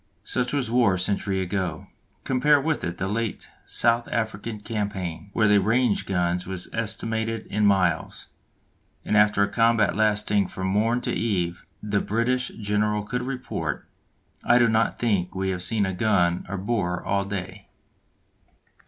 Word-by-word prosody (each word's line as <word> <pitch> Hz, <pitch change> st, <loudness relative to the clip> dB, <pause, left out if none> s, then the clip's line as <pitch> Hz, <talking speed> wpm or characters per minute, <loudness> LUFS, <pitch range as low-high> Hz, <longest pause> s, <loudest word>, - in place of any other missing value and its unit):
Such 125 Hz, -1 st, -2 dB
was 135 Hz, -6 st, -1 dB
war 120 Hz, -6 st, +4 dB
a -, -, -2 dB
century 95 Hz, +1 st, 0 dB
ago. 90 Hz, -4 st, -3 dB, 0.4 s
Compare 145 Hz, +3 st, +3 dB
with 155 Hz, +2 st, -1 dB
it 85 Hz, 0 st, -3 dB
the 95 Hz, -, -2 dB
late 110 Hz, +1 st, -3 dB, 0.2 s
South 120 Hz, 0 st, +3 dB
African 110 Hz, -1 st, -3 dB
Campaign 100 Hz, -5 st, -4 dB
where 110 Hz, -, +3 dB
the 105 Hz, -1 st, +5 dB
range 110 Hz, +2 st, +2 dB
of -, -, -15 dB
guns 90 Hz, -1 st, 0 dB
was 95 Hz, -2 st, -5 dB
estimated 115 Hz, 0 st, -2 dB
in 105 Hz, 0 st, +2 dB
miles, 95 Hz, 0 st, +1 dB, 0.8 s
and -, -, 0 dB
after 105 Hz, -1 st, +4 dB
a -, -, +2 dB
combat 115 Hz, 0 st, +2 dB
lasting 105 Hz, -2 st, +2 dB
from 95 Hz, -, -5 dB
morn 110 Hz, +6 st, +1 dB
to -, -, -2 dB
eve, 90 Hz, -6 st, -2 dB, 0.2 s
the 105 Hz, -1 st, 0 dB
British 125 Hz, +4 st, 0 dB
general 105 Hz, 0 st, 0 dB
could 120 Hz, +4 st, -3 dB
report: 125 Hz, -, -4 dB, 0.6 s
"I 120 Hz, -, +5 dB
do 120 Hz, -, +5 dB
not 110 Hz, 0 st, +1 dB
think 100 Hz, -7 st, 0 dB
we 95 Hz, 0 st, -1 dB
have 90 Hz, -1 st, -3 dB
seen 100 Hz, +3 st, +1 dB
a 95 Hz, -, -2 dB
gun 90 Hz, -3 st, +1 dB
or 95 Hz, -, -3 dB
a -, -, -3 dB
Boer 95 Hz, -3 st, -2 dB
all 100 Hz, 0 st, +1 dB
day." 100 Hz, 0 st, -6 dB
105 Hz, 160 wpm, -25 LUFS, 95-115 Hz, 0.8 s, the